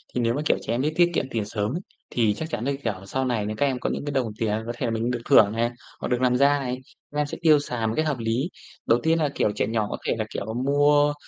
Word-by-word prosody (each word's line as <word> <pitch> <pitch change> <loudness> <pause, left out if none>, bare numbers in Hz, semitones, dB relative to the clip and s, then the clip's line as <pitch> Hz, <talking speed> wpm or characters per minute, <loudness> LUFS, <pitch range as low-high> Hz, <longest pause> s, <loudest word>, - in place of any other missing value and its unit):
thì 125 - +1
nếu 115 0 +2
mà 145 - -1
kiểu - - +3
trẻ 115 - -2
em 125 - 0
biết 155 +2 0
tiết 175 0 +4
kiệm - - +1
tiền 110 -3 -1
sớm 105 +1 -2
ấy, 180 - -3 0.3
thì 110 -4 +2
chắc 160 +9 -5
chắn 120 -4 -3
là 140 - +1
kiểu 115 -3 0
sau 130 +5 -1
này 115 -5 0
nè, 105 - -2
các 145 - +2
em 130 -2 0
có - - -1
những - - -3
cái 145 - -2
đồng 125 -5 0
tiền 110 -1 0
có 120 - -3
thể 125 - -2
là 115 - 0
mình 115 +2 -1
được 120 - -2
thưởng 105 -1 +7
này, 115 +1 +1 0.3
hoặc - - -3
được 125 0 0
làm 125 -1 +3
ra 140 +1 +4
này, 125 -1 -3 0.3
các 145 - -6
em 150 - +2
sẽ - - -6
tiêu 155 -3 +6
xài 120 -5 -2
một 110 - -1
cách 155 - +2
hợp 145 -4 0
lý. 115 +9 0 0.4
Đầu 115 +1 +4
tiên 165 +1 +3
là 150 -2 +2
kiểu 105 - +2
trẻ - - 0
nhỏ 110 -2 0
có - - -3
thể - - +2
là, 110 - -1
kiểu, 110 +2 -4
mua 145 +1 +4
125 Hz, 315 wpm, -25 LUFS, 115-145 Hz, 0.4 s, thưởng